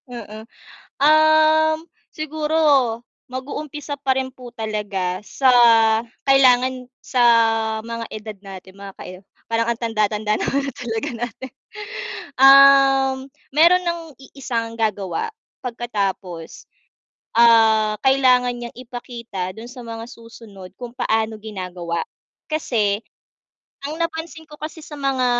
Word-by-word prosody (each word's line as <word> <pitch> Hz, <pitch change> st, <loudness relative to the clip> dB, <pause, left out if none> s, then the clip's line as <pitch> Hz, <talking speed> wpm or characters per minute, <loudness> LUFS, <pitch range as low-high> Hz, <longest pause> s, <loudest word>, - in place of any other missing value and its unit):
Mm. 220 Hz, -2 st, -9 dB, 0.5 s
Um, 310 Hz, +1 st, +5 dB, 0.4 s
siguro, 310 Hz, 0 st, -2 dB, 0.7 s
mag-u-umpisa 285 Hz, +3 st, -6 dB
pa 270 Hz, -1 st, +1 dB
rin 260 Hz, 0 st, -2 dB
po 250 Hz, -2 st, -12 dB
talaga 205 Hz, -5 st, -3 dB
sa 270 Hz, -, +1 dB, 0.8 s
kailangan 255 Hz, -1 st, +4 dB, 0.2 s
sa 255 Hz, -, -1 dB, 0.6 s
mga 230 Hz, 0 st, -5 dB
edad 215 Hz, -1 st, -7 dB
natin 190 Hz, -1 st, -11 dB
mga 200 Hz, 0 st, -9 dB
kae 185 Hz, -, -8 dB, 0.3 s
parang 230 Hz, 0 st, +1 dB
ang 235 Hz, 0 st, -2 dB
tanda-tanda 215 Hz, -2 st, 0 dB
na -, -, -3 dB
nga 280 Hz, -, 0 dB, 0.2 s
talaga 240 Hz, +3 st, -4 dB
natin. 250 Hz, +2 st, -9 dB, 0.9 s
Um, 270 Hz, 0 st, +7 dB, 0.4 s
meron 340 Hz, +5 st, +5 dB
ng 340 Hz, -1 st, -2 dB, 0.3 s
i-isang 235 Hz, -4 st, -3 dB
gagawa 220 Hz, -, -1 dB, 0.4 s
pagkatapos, 200 Hz, -8 st, -4 dB, 0.7 s
ah, 220 Hz, -2 st, +5 dB
kailangan 255 Hz, -2 st, +4 dB
niyang 240 Hz, 0 st, -8 dB
ipakita 235 Hz, -6 st, -6 dB
dun 225 Hz, +2 st, -9 dB
sa 250 Hz, -1 st, -10 dB
mga 230 Hz, 0 st, -7 dB
susunod 225 Hz, -6 st, -13 dB
kung 245 Hz, -1 st, -8 dB
paano 220 Hz, 0 st, 0 dB
ginagawa 180 Hz, -5 st, -5 dB, 0.5 s
kasi, 215 Hz, -9 st, 0 dB, 0.9 s
ang 305 Hz, +2 st, -6 dB
napansin 325 Hz, 0 st, -4 dB
ko 300 Hz, -, -12 dB
kasi 310 Hz, +1 st, -7 dB
sa 305 Hz, -, -10 dB
mga 270 Hz, -2 st, 0 dB
240 Hz, 110 wpm, -21 LUFS, 215-275 Hz, 0.9 s, Um